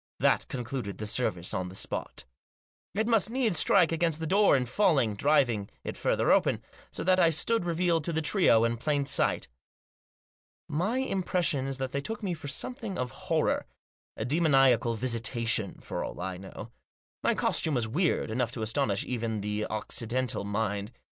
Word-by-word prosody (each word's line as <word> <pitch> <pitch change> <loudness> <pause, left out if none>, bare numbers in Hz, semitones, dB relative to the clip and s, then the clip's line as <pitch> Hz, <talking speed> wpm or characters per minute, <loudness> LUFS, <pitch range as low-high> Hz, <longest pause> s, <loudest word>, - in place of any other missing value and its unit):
That - - +2
concluded 120 -5 -5
the 105 - -5
service 100 -5 0
on 90 0 -2
the 95 - -11
spot 60 - -6 0.7
It 220 +2 +1
must 225 -3 +3
needs 230 -8 +2
strike 180 -5 +4
against 165 -1 0
the 160 - -3
door 195 -1 +4
in 125 - -1
falling, 135 - +2
driving 120 -4 +2
it - - -5
further - - +1
open, - - +2 0.3
so - - -4
that 185 +1 +3
I 170 - +6
stood 180 +6 +1
revealed 170 -1 +1
to - - 0
the 160 - 0
trio 150 - +4
in 115 0 0
plain 145 +3 0
sight. 140 0 0 1.2
My 185 - -1
impression 180 - 0
is 135 -1 -2
that 130 -1 -3
they 140 - -2
took 220 +8 -6
me 185 -3 -1
for 155 -3 -8
something 220 - -3
of 125 -2 -3
horror; - - -1 0.5
a 110 - -3
demoniacal 135 -5 +3
visitation, 115 -2 0
for - - -5
all - - -7
I 90 0 -4
know. 95 +4 -10 0.5
My - - +2
costume 155 -3 +1
was 120 -2 0
weird 150 -1 0
enough 125 +1 0
to 110 - -3
astonish 110 -3 0
even 115 -4 -3
the 105 +1 -2
Occidental 115 +3 -2
mind. 100 0 -2
135 Hz, 170 wpm, -28 LUFS, 110-170 Hz, 1.2 s, I